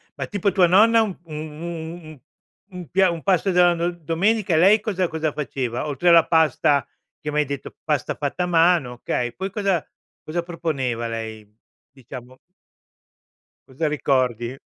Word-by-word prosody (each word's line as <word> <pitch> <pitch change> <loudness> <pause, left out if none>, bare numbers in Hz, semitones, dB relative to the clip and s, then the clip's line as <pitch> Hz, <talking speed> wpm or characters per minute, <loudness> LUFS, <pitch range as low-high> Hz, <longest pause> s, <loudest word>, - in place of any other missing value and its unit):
ma - - -4
tipo 205 -1 0
tua 185 -2 +5
nonna 225 +6 +5
un 205 -4 -2
un 155 -2 -9 0.3
un 170 0 -6
un 155 -3 -12 0.5
un 180 -3 -8
pia 190 0 +3
un 165 - -5
pasto 190 +1 +1
della 175 -1 +5
do 170 +1 -1
domenica, 175 +4 0
lei 195 +7 +5
cosa 190 -5 -2
cosa 160 -2 -2
faceva? 130 -4 -3
Oltre 145 +4 -2
alla 170 -2 +7
pasta, 150 -4 +2 0.3
che 150 - -5
m'hai 150 0 +2
detto 140 0 -7
pasta 150 -5 -1
fatta 145 +5 -2
a - - 0
mano, 170 -6 +3
okay, 120 0 -3
poi 190 +6 -4
cosa 195 -5 0 0.4
cosa 170 +3 -3
proponeva 140 -9 -3
lei 110 -1 -6 0.5
diciamo. 130 -1 -11 1.3
Cosa 140 +4 -2
ricordi? 130 -4 0
160 Hz, 155 wpm, -22 LUFS, 135-180 Hz, 1.3 s, alla